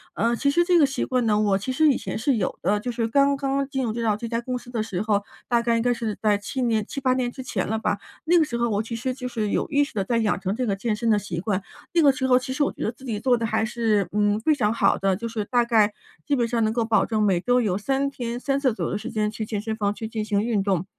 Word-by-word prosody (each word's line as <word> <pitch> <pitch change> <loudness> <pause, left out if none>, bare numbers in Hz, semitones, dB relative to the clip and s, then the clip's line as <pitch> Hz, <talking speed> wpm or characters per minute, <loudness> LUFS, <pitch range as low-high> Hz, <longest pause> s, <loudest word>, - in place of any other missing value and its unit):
呃， 235 +2 +1
其 280 +4 +1
实 345 +3 +3
这 355 -1 +4
个 305 - +6
习 270 +1 -2
惯 255 -2 0
呢， 210 -1 +2
我 200 -2 +2
其 230 +7 -4
实 310 +4 +3
以 270 - +3
前 - - -5
是 250 +3 +1
有 195 -5 -2
的， 205 +1 +1
就 245 - -3
是 230 -1 -1
刚 280 +3 +3
刚 275 0 0
进 265 -2 -1
入 220 - -2
到 225 -3 0
这 230 - -5
家 230 0 -2
公 250 +1 -3
司 245 - -12
的 225 -3 -2
时 195 -4 -3
候， 210 -2 +1 0.2
大 235 -1 +2
概 235 0 +1
应 - - +1
该 245 +1 +2
是 225 -3 -4
在 210 -2 +3
7 205 +6 -4
年 225 -3 +1
7-8 265 -2 0
年 250 -1 -1
之 260 - -8
前 220 -7 -2
了 220 +1 -1
吧。 205 - 0 0.3
那 345 +2 +4
个 330 - +5
时 240 -6 -3
候 235 0 +1
我 210 +1 0
其 230 - -7
实 240 +3 -2
就 255 0 -8
是 225 -4 -2
有 - - -1
意 290 -1 +3
识 305 - -12
地 200 -2 -1
在 230 +4 0
养 220 -2 +1
成 195 +1 -1
这 255 +3 -2
个 200 -4 0
健 215 +3 -1
身 230 +1 0
的 215 - +4
习 185 -5 -4
惯。 200 +1 -1 0.3
那 340 - +4
个 285 - +6
时 260 0 -2
候 250 -1 +5
其 255 +1 -6
实 285 - +1
我 - - 0
觉 - - -6
得 220 - 0
自 255 - -19
己 220 -5 -3
做 245 +1 +3
得 230 - -2
还 220 0 0
是， 220 -4 +1
嗯， 205 0 +2
非 305 +7 +2
常 215 -6 +1
好 205 -4 +3
的， 195 -1 +1
就 230 +4 -5
是 225 -2 -3
大 240 +2 +2
概 215 -3 +3 0.3
基 290 - +1
本 240 -3 +1
上 230 -1 0
能 215 - +2
够 235 0 +1
保 220 -1 +3
证 220 -2 -1
每 190 -4 +3
周 245 +4 +2
有 190 -5 0
3 270 +6 0
天 240 -3 -5
3 275 +1 0
次 265 -4 +2
左 - - -3
右 - - -2
的 205 - -1
时 - - -6
间 215 -2 0
去 220 0 -4
健 210 -1 -3
身 220 0 -3
房 205 -2 0
去 220 - -6
进 220 -1 -3
行 205 -2 +1
运 225 -4 0
动， 190 -3 0
230 Hz, 330 characters per minute, -24 LUFS, 210-255 Hz, 0.3 s, 个